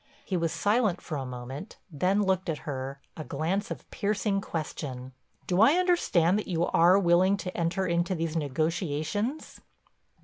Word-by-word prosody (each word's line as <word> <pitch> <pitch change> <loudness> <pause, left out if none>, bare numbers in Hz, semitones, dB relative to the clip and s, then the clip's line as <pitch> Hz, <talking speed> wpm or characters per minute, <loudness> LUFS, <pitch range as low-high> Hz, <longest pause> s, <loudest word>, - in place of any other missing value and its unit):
He 190 - -2
was 165 -2 0
silent 210 -3 +1
for 155 - -6
a 135 -2 -3
moment, 125 - -7
then 185 +7 +1
looked 190 -1 0
at 155 - -4
her, 135 -1 -4 0.2
a 155 - -6
glance 185 +7 -2
of - - -7
piercing 200 -1 0
question. 130 -7 -5 0.3
"Do 180 +2 +2
I 230 +7 +7
understand 325 - +3
that - - -5
you 170 -2 +1
are 175 +3 +5
willing 185 +1 +4
to 180 -2 -6
enter 170 +3 0
into 170 +1 0
these 165 -1 -2
negotiations?" 160 - -2
175 Hz, 160 wpm, -28 LUFS, 155-195 Hz, 0.3 s, I